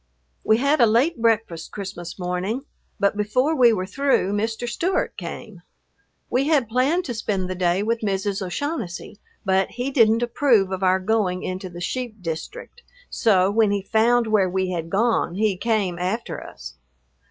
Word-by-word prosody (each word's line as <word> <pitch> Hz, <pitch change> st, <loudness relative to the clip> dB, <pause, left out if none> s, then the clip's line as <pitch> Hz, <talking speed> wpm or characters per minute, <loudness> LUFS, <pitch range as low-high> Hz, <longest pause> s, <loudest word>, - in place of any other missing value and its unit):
We 220 Hz, -, +4 dB
had 280 Hz, +3 st, +2 dB
a 235 Hz, -, +7 dB
late 240 Hz, +7 st, +2 dB
breakfast 220 Hz, -8 st, 0 dB
Christmas 185 Hz, -4 st, -7 dB
morning, 185 Hz, +7 st, -2 dB, 0.4 s
but 200 Hz, +1 st, +2 dB
before 250 Hz, +9 st, +1 dB
we 245 Hz, -4 st, +6 dB
were 185 Hz, -4 st, -1 dB
through 265 Hz, -3 st, +1 dB
Mr. 225 Hz, +3 st, -2 dB
Stewart 365 Hz, +9 st, -1 dB
came. -, -, -8 dB, 0.7 s
We 265 Hz, +3 st, 0 dB
had 290 Hz, -7 st, +2 dB
planned 270 Hz, +10 st, +1 dB
to 245 Hz, -, -3 dB
spend 205 Hz, -4 st, -2 dB
the 185 Hz, -, -3 dB
day 180 Hz, +1 st, +1 dB
with 230 Hz, +2 st, 0 dB
Mrs. 200 Hz, -1 st, -1 dB
O'Shaughnessy, 200 Hz, -, -4 dB, 0.3 s
but 190 Hz, 0 st, +2 dB
he 250 Hz, +3 st, -4 dB
didn't 230 Hz, -3 st, +4 dB
approve 235 Hz, -5 st, +2 dB
of 190 Hz, 0 st, -3 dB
our 185 Hz, 0 st, +3 dB
going 190 Hz, -2 st, 0 dB
into 185 Hz, 0 st, -4 dB
the 175 Hz, 0 st, -9 dB
sheep 235 Hz, +3 st, -4 dB
district, 180 Hz, -, -7 dB, 0.3 s
so 195 Hz, -4 st, +3 dB
when 220 Hz, 0 st, +3 dB
he 200 Hz, -1 st, -1 dB
found 230 Hz, +3 st, +3 dB
where 210 Hz, -4 st, +2 dB
we 185 Hz, 0 st, -1 dB
had 165 Hz, -2 st, -4 dB
gone 210 Hz, -3 st, +1 dB
he 210 Hz, -1 st, +1 dB
came 195 Hz, -4 st, -1 dB
after 190 Hz, +6 st, -3 dB
us. -, -, -10 dB
215 Hz, 165 wpm, -23 LUFS, 185-240 Hz, 0.7 s, a